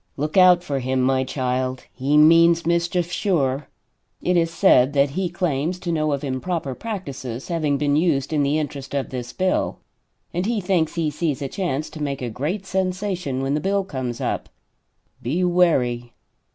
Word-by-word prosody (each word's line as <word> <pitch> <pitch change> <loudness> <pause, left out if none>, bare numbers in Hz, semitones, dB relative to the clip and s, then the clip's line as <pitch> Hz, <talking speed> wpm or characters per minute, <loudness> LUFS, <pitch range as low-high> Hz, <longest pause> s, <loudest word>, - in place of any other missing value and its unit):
"Look 150 +2 -3
out 180 -2 +6
for 140 -5 -2
him, 130 +1 -1
my 130 0 +2
child! 130 -1 -2
He 140 +3 +1
means 165 +2 +6
mischief, 170 +1 0
sure. 150 -8 0 0.5
It 180 - 0
is 165 -1 +3
said 145 -6 +4
that 140 -1 +3
he 185 +4 -1
claims 170 -1 -1
to 180 -1 -4
know 155 -2 0
of 140 0 -2
improper 140 +2 -2
practices 135 - -6
having 155 -4 0
been 145 0 +1
used 155 -3 +1
in 150 - +2
the 145 +2 +1
interest 140 -2 -4
of 140 - -2
this 125 -2 -5
bill, 185 0 0 0.6
and 180 +3 -1
he 230 -2 0
thinks 180 -4 0
he 160 -3 0
sees 150 -3 -2
a - - -2
chance 150 -2 -2
to 155 - -8
make 140 -3 -3
a 120 - -3
great 165 - -3
sensation 185 -7 -2
when 135 +1 0
the 150 - +1
bill 200 +2 +1
comes 130 -9 -4
up. - - -2 0.7
Be 155 +10 -1
wary. 130 -10 +2
150 Hz, 180 wpm, -22 LUFS, 135-180 Hz, 0.7 s, out